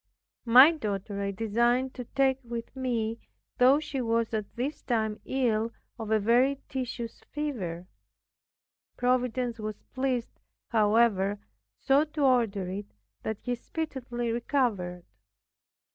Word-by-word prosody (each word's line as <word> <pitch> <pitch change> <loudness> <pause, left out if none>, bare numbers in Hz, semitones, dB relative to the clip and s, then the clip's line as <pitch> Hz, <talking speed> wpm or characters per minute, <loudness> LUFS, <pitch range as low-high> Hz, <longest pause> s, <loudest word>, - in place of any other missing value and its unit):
My 255 +7 +9
daughter 205 - -3
I 200 - -1
designed 235 +5 +1
to 250 - -7
take 270 +1 +1
with 235 +1 -6
me, 235 -3 -1 0.4
though 260 +3 +6
she 290 -3 -3
was 230 -1 0
at 215 -2 -3
this 265 +6 -3
time 220 -3 -1
ill 230 -4 0 0.3
of 220 -2 -5
a 220 - +4
very 245 +6 +3
tedious 245 -3 -4
fever. 205 - -3 1.1
Providence 250 -1 0
was 215 -1 -5
pleased, 260 -3 -2 0.3
however, 210 -3 +3 0.4
so 275 +2 +3
to 305 0 -5
order 230 -8 +2
it 200 - -6 0.3
that 220 -2 -5
she 245 - 0
speedily 245 -3 -4
recovered. 220 - -1
235 Hz, 120 wpm, -28 LUFS, 215-260 Hz, 1.1 s, My